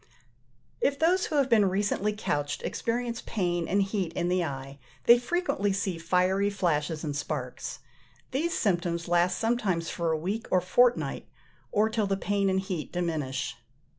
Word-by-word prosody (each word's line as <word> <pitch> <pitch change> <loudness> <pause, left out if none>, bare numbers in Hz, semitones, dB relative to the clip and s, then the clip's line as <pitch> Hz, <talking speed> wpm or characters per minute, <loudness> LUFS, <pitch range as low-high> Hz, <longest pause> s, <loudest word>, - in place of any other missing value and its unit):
If 280 0 +2
those 350 +5 +3
who 310 - -3
have 280 -3 +3
been 215 -6 +4
recently 205 +2 0
couched 145 -9 -2
experience 235 0 -2
pain 175 -5 -1
and 200 +2 +2
heat 195 -3 -2
in 175 0 -1
the 180 0 +2
eye, 135 -2 -6 0.2
they 235 +1 +7
frequently 245 - 0
see 190 -3 -2
fiery 185 +4 +2
flashes 165 -5 -1
and 145 -2 -3
sparks: 145 -3 -4 0.5
these 320 +6 0
symptoms 175 -3 0
last 175 +1 +2
sometimes 210 -8 0
for 170 -1 -1
a 160 - +1
week 195 +8 -3
or 185 - +4
fortnight, 240 +7 +2 0.4
or 210 +1 +3
till 220 -2 0
the 195 0 0
pain 200 0 +1
and 190 0 +1
heat 185 -5 -4
diminish. 155 -7 -2
190 Hz, 160 wpm, -28 LUFS, 170-215 Hz, 0.5 s, they